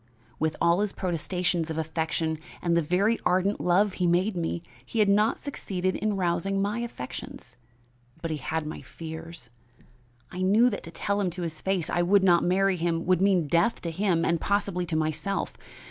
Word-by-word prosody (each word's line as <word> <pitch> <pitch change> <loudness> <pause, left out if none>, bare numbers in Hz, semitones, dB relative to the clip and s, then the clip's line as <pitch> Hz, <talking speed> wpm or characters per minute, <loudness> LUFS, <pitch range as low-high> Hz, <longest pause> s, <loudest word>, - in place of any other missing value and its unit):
With 160 0 0
all 170 +2 +3
his 205 -1 0
protestations 175 -1 -1
of 160 - -3
affection 160 0 -1 0.2
and 170 -1 +1
the 170 - +4
very 195 +8 +2
ardent 185 +3 +2
love 190 +3 +3
he 180 -1 0
made 185 +4 +2
me, 170 0 -2 0.2
he 130 - -7
had 210 -2 +4
not 210 +3 +3
succeeded 185 -9 -3
in 210 -1 -1
rousing 185 +2 0
my 205 +4 0
affections, 230 - -7 0.6
but 165 0 -4
he 155 - -1
had 160 +3 -3
my 155 - -6
fears. 160 -5 -9 0.8
I 180 - -5
knew 215 +6 +4
that - - -4
to 165 - -9
tell 200 +3 -1
him 190 - +1
to 175 +1 -6
his 160 -2 -5
face 190 -4 0
I 175 - +1
would 190 +3 +4
not 175 -3 +5
marry 190 +1 +2
him 165 0 -1
would 185 0 +3
mean 190 -4 +3
death 170 +9 +2
to 170 - -3
him 175 -2 +1
and 165 -1 +1
possibly 195 -3 0
to 160 - -2
myself. 155 +5 -1
180 Hz, 190 wpm, -27 LUFS, 165-195 Hz, 0.8 s, not